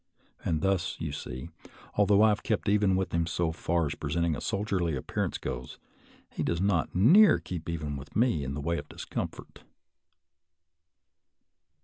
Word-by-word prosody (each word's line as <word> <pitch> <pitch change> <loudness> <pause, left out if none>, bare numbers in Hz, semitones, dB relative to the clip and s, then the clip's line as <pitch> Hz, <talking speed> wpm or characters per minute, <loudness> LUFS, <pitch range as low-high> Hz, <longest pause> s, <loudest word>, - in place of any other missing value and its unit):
And 80 -2 0
thus, 95 -2 0
you 80 -2 -3
see, 65 +1 -6 0.4
although 105 0 +4
I 110 - +7
have 105 0 0
kept 110 - -1
even 100 -2 +3
with 95 0 -1
him 85 -1 +1
so 85 -1 0
far 85 0 0
as 70 - -2
presenting 80 +2 -1
a - - -6
soldierly 95 -6 -1
appear 65 - -2
ance - - -3
goes, 60 0 -6 0.5
he - - -5
does 85 - 0
not 95 -5 +1
near 170 - +7
keep 85 -3 -6
even 75 -3 -3
with 70 +1 -10
me 110 - +2
in 65 +1 -4
the 75 - -4
way 85 +3 -1
of - - -10
discomfort. - - -6
85 Hz, 165 wpm, -29 LUFS, 75-100 Hz, 0.5 s, I